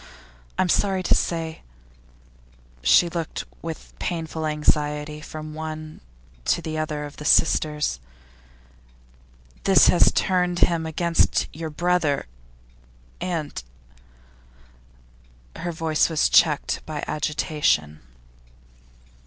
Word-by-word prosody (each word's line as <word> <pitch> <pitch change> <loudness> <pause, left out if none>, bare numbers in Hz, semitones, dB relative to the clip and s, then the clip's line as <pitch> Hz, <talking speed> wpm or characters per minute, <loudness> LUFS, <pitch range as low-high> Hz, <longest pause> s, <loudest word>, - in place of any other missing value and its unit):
I - - +3
am 180 - -2
sorry 190 0 +2
to - - +3
say' 165 -2 -1 1.2
she 120 - +5
looked 170 -1 -4 0.2
with 165 -1 -7
painful 160 -2 -3
anxiety 150 0 0
from 155 0 -8
one 155 0 -7 0.4
to - - +2
the 160 -2 -5
other 150 -1 -3
of 145 - -11
her - - -7 0.4
hearers 150 - -2 1.6
'this - - +6
has - - +5
turned 180 -1 +1
him 165 -2 +2
against 165 +1 +1
your 160 +1 -5
brother, 170 -2 0 1.0
and 165 - -3 1.0
' - - -24
Her 175 - -3
voice 160 -1 +1
was 160 -2 +2
checked 150 -3 +3
by 155 -2 -4
agitation. 150 - 0
155 Hz, 105 wpm, -24 LUFS, 150-165 Hz, 1.6 s, this